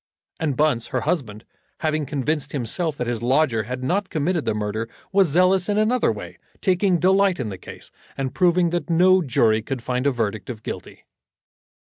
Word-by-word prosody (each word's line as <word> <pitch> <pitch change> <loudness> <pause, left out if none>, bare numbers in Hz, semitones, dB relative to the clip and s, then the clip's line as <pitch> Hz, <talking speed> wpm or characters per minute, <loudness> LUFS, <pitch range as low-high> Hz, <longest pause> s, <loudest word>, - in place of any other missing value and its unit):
And 150 -5 -1
Bunce, 145 -6 +2
her 125 - -2
husband, 110 - -2 0.4
having 155 -2 0
convinced 145 +1 -2
himself 145 +4 -2
that 125 - -2
his 120 -1 -2
lodger 130 -1 +2
had 125 +2 -5
not 185 +8 0
committed 160 +1 -1
the 105 - 0
murder, 105 +2 -3 0.2
was 195 -2 +4
zealous 180 +4 +3
in 205 - +1
another 225 +4 +2
way, - - -8 0.2
taking 185 -1 +2
delight 190 +1 +3
in 120 -4 -2
the 95 -2 -7
case, - - -11 0.3
and 135 -1 -3
proving 175 +2 +3
that 175 0 -2
no 185 +3 +5
jury 115 -6 +2
could 120 +2 -5
find 125 +2 -1
a - - +4
verdict 110 -5 -3
of 110 -3 -7
guilty. - - -7
145 Hz, 180 wpm, -23 LUFS, 120-180 Hz, 0.4 s, no